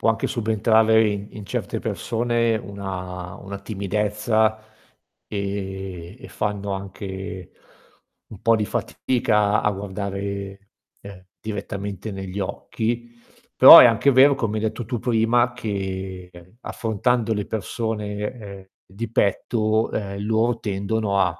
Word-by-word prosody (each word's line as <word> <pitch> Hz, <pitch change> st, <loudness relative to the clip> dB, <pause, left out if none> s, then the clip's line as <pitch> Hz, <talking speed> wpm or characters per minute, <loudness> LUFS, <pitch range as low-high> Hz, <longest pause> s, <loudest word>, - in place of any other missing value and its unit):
può -, -, +3 dB
anche 110 Hz, -, 0 dB
subentrare 110 Hz, 0 st, +3 dB
in 100 Hz, 0 st, -3 dB
in 105 Hz, -2 st, -9 dB
certe -, -, -3 dB
persone 115 Hz, -1 st, 0 dB
una 90 Hz, -3 st, -6 dB
una 100 Hz, 0 st, -8 dB
timidezza, 105 Hz, +2 st, 0 dB, 0.7 s
ehm, 95 Hz, -2 st, -5 dB
e 130 Hz, -, -10 dB
fanno 100 Hz, -2 st, -3 dB
anche 95 Hz, -1 st, -7 dB, 0.8 s
un 105 Hz, -, -12 dB
po' 115 Hz, 0 st, +4 dB
di 105 Hz, -, 0 dB
fatica 105 Hz, -5 st, +1 dB
a 105 Hz, -, +2 dB
guardare, 100 Hz, 0 st, -5 dB, 0.3 s
ehm, 100 Hz, -2 st, -12 dB
direttamente 100 Hz, 0 st, -5 dB
negli 95 Hz, 0 st, -6 dB
occhi. 115 Hz, +4 st, -3 dB, 0.5 s
Però -, -, +12 dB
è -, -, +10 dB
anche 115 Hz, +4 st, +4 dB
vero, 135 Hz, +2 st, +6 dB
come 110 Hz, -5 st, -2 dB
hai 105 Hz, -, -3 dB
detto 110 Hz, +2 st, -2 dB
tu 120 Hz, +1 st, -3 dB
prima, 120 Hz, +1 st, +2 dB
che, 95 Hz, -5 st, -4 dB
ehm, 90 Hz, +6 st, -16 dB
affrontando 115 Hz, +1 st, 0 dB
le 105 Hz, -2 st, -2 dB
persone, 110 Hz, -1 st, -3 dB
ehm, 105 Hz, -3 st, -7 dB, 0.2 s
di 105 Hz, +4 st, -6 dB
petto, 110 Hz, +1 st, +1 dB
ehm, 100 Hz, -2 st, -4 dB
loro 115 Hz, +2 st, +1 dB
tendono 100 Hz, 0 st, -1 dB
a 90 Hz, -3 st, 0 dB
105 Hz, 125 wpm, -23 LUFS, 100-110 Hz, 0.8 s, Però